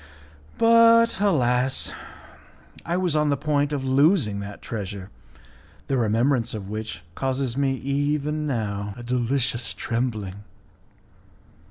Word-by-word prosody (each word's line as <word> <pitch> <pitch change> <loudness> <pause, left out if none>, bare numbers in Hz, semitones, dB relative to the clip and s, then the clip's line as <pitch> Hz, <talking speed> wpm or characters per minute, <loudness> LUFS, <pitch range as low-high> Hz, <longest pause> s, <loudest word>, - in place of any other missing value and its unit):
But, 230 -1 +5
alas! 130 -9 +1 0.9
I 170 +1 -1
was 180 -4 0
on 150 -1 +2
the 140 - +1
point 145 0 0
of 140 -2 -2
losing 135 - +3
that 100 0 -7
treasure, 100 -3 -6 0.7
the 135 - -1
remembrance 120 +1 +1
of 100 -3 -6
which 110 -6 -5
causes 130 +1 -2
me, 135 -1 +1
even 145 +3 -1
now, 100 -5 -3
a 120 - -8
delicious 120 -1 -1
trembling. 110 -5 -3
130 Hz, 115 wpm, -24 LUFS, 110-145 Hz, 0.9 s, But